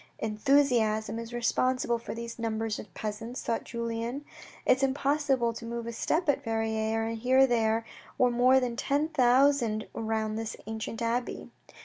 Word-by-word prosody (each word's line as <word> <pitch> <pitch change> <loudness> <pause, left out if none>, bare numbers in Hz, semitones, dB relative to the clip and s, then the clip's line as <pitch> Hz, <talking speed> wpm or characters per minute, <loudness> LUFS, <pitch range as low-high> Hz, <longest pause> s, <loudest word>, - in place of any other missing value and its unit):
"Enthusiasm 225 -1 +2
is 230 0 -7
responsible 240 0 +1
for 230 - -6
these 235 0 -7
numbers 225 -1 -2
of 200 - -10
peasants," 225 +3 -5
thought 230 - -1
Julien. 235 +4 -4 0.4
It - - +5
was - - -6
impossible 270 -3 +1
to 230 - -9
move 235 0 -4
a 235 - -5
step 320 +9 0
at 280 -1 +2
Verrieres, 225 -1 -1
and 230 0 -3
here 260 +3 +5
there 225 -2 +1 0.3
were 250 -1 +4
more 250 +2 +5
than 245 -2 -2
ten 290 +5 0
thousand 250 -5 +3
round 220 -1 -2
this 225 0 -5
ancient 220 +1 -5
abbey. 240 +2 -2
235 Hz, 155 wpm, -29 LUFS, 225-255 Hz, 0.4 s, It